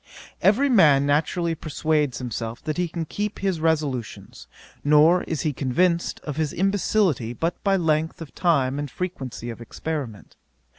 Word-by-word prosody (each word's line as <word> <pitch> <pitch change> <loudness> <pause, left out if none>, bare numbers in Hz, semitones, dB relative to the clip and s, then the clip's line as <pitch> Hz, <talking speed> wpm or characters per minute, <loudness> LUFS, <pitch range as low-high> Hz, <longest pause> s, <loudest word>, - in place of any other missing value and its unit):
Every 240 +8 +4
man 150 - +5
naturally 165 +4 +1
persuades 150 -3 -1
himself 115 -2 -5
that 155 - -3
he 180 0 0
can 165 0 -4
keep 205 +6 -4
his 190 -4 -1
resolutions, 150 -8 -2 0.4
nor 150 +5 +5
is 160 - -3
he 155 -3 -1
convinced 170 +7 0
of 150 -1 -6
his 155 -3 -1
imbecility 190 - +1
but 165 +8 -3
by 195 -1 +3
length 160 -2 0
of 165 -3 -9
time 140 -6 +1
and 145 -1 -4
frequency 130 -8 -5
of 115 - -10
experiment. 125 -3 -6
155 Hz, 150 wpm, -24 LUFS, 135-175 Hz, 0.4 s, man